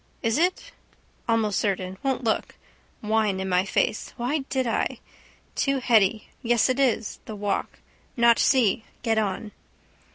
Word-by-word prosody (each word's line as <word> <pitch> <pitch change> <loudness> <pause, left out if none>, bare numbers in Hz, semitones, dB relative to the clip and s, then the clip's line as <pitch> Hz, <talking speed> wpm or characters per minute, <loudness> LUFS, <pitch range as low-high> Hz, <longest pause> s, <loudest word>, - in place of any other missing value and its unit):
Is 230 +4 +1
it? 365 +8 0 0.6
Almost 220 -3 +2
certain. 190 -2 -1
Won't 265 -1 -1
look. 220 -2 -1 0.5
Wine 215 -2 +1
in 190 - -3
my 180 0 +2
face. 205 - -1
Why 250 +6 0
did 260 -1 0
I? 230 - -1 0.6
Too 275 -1 +1
heady. 220 -4 +2
Yes, 240 0 +2
it 255 +1 0
is. 240 -5 +1
The 215 - -7
walk. 205 -1 -2 0.4
Not 235 0 +5
see. 225 -6 +3 0.2
Get 225 -2 +2
on. 210 +1 -2
225 Hz, 140 wpm, -25 LUFS, 205-255 Hz, 0.6 s, Not